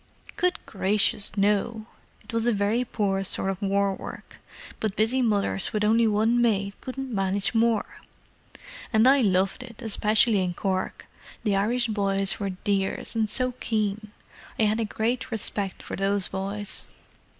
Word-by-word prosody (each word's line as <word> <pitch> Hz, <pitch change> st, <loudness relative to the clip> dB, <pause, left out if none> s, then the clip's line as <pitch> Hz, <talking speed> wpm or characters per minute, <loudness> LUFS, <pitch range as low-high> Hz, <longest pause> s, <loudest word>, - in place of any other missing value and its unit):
"Good 360 Hz, 0 st, +1 dB
gracious, 205 Hz, +1 st, +1 dB
no! 210 Hz, +2 st, +1 dB, 0.4 s
It 250 Hz, -, -11 dB
was 230 Hz, +1 st, 0 dB
a -, -, +4 dB
very 210 Hz, +3 st, +1 dB
poor 200 Hz, -5 st, -1 dB
sort 195 Hz, 0 st, +2 dB
of 190 Hz, +1 st, -7 dB
war 200 Hz, 0 st, +1 dB
work, -, -, -9 dB, 0.4 s
but 215 Hz, -2 st, -2 dB
busy 225 Hz, +5 st, +2 dB
mothers 205 Hz, -4 st, +1 dB
with 210 Hz, -1 st, 0 dB
only 225 Hz, +2 st, +4 dB
one 220 Hz, +3 st, +2 dB
maid 200 Hz, -4 st, +1 dB
couldn't 260 Hz, -1 st, -6 dB
manage 195 Hz, +1 st, 0 dB
more. 230 Hz, -1 st, +1 dB, 0.9 s
And 220 Hz, +1 st, +4 dB
I 275 Hz, +1 st, +6 dB
loved 195 Hz, +1 st, +1 dB
it, 235 Hz, -3 st, -11 dB
especially 215 Hz, -2 st, +2 dB
in 175 Hz, -1 st, -3 dB
Cork: 190 Hz, -1 st, -2 dB, 0.4 s
the 210 Hz, -3 st, +1 dB
Irish 235 Hz, +5 st, +1 dB
boys 195 Hz, -3 st, 0 dB
were 200 Hz, -1 st, -2 dB
dears, 195 Hz, +3 st, -2 dB
and 220 Hz, -2 st, +1 dB
so 255 Hz, +3 st, +2 dB
keen. 215 Hz, -1 st, -2 dB, 0.5 s
I -, -, +2 dB
had 215 Hz, +1 st, +2 dB
a 225 Hz, -, 0 dB
great 235 Hz, +4 st, -2 dB
respect 205 Hz, -3 st, -2 dB
for -, -, -5 dB
those 195 Hz, 0 st, 0 dB
boys. 200 Hz, +1 st, -4 dB
210 Hz, 155 wpm, -26 LUFS, 195-230 Hz, 0.9 s, I